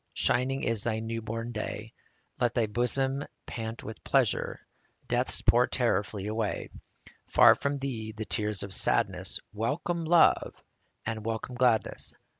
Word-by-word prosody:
Shining 130 +2 +1
is 115 -2 +1
thy 110 -2 0
new 115 +1 -3
born 115 +2 -4
day; 110 0 -5 0.5
Let 120 -2 +1
thy 120 -3 +3
bosom 130 +5 0 0.2
pant 115 0 -5
with 110 0 -8
pleasure, - - +1 0.5
Death's - - -1
poor - - +5
terror - - +2
flee 100 0 -6
away; 110 0 -2 0.6
Far - - +7
from 140 0 -2
thee 120 -6 -4
the 110 0 -6
tears 105 -3 -1
of 100 -2 -5
sadness, - - +1
Welcome 155 +10 -1
love 170 +1 +4 0.4
and 110 -1 -3
welcome 115 +3 -3
gladness 120 -4 +1
115 Hz, 140 wpm, -29 LUFS, 110-125 Hz, 0.6 s, Far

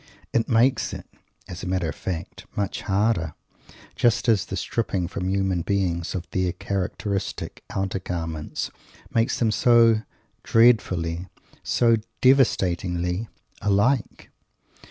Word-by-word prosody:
It 115 +2 +1
makes 120 +1 +2
it, - - -9 0.4
as 90 - -7
a - - -5
matter 90 -2 0
of 80 - -3
fact, 85 -3 -6
much 100 -2 -2
harder, 95 -5 0 0.6
just 120 0 +2
as 105 -6 +3
the 95 - -4
stripping 95 -2 -1
from 90 0 -3
human 95 -2 +1
beings 90 -2 -1
of 85 -2 -4
their 90 -2 0
characteristic 100 +1 -3
"outer 95 0 -2
garments" 80 -4 -4 0.4
makes 115 0 +2
them 115 -2 +2
so 115 -1 +5 0.4
dreadfully, 95 -7 +3 0.3
so 115 -2 +3 0.2
devastatingly, 90 -7 +2 0.3
alike! 105 +4 +1
95 Hz, 115 wpm, -24 LUFS, 90-115 Hz, 0.6 s, so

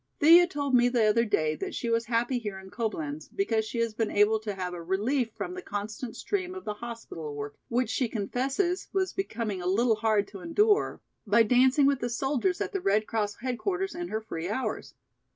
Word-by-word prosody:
Thea 340 +4 +8
told 285 -6 -3
me 245 0 +5
the 240 -3 +2
other 225 +2 +3
day 155 -7 +1
that - - -5
she 235 - -3
was 230 0 +1
happy 240 +2 0
here 210 -4 -5
in 190 0 -11
Coblenz 155 -10 -3
because 225 - +1
she 225 - -5
has 230 -1 0
been 225 0 -1
able 210 +2 +3
to 210 -2 -5
have 180 -1 -4
a 175 - -6
relief 220 +9 0
from - - -4
the 370 - -6
constant 215 - -5
strain 370 -2 -3
of 375 - -8
the 210 - -2
hospital 210 -10 -7
work, 145 0 -5
which 245 +2 0
she 255 - +1
confesses 265 - -1
was 380 -1 0
becoming 225 - -3
a 175 - -3
little 220 +4 +3
hard 215 -2 +2
to 200 - -9
endure, 415 - +2 0.3
by 220 +3 +5
dancing 255 +5 +4
with 275 -1 +3
the 240 - -2
soldiers 270 +8 0
at - - -2
the 390 - -1
Red 210 - +2
Cross 210 -2 -1
headquarters 365 - -2
in 345 +1 -4
her 220 -6 -3
free 175 -5 -5
hours. 255 +5 -3
230 Hz, 210 wpm, -28 LUFS, 205-275 Hz, 0.3 s, Thea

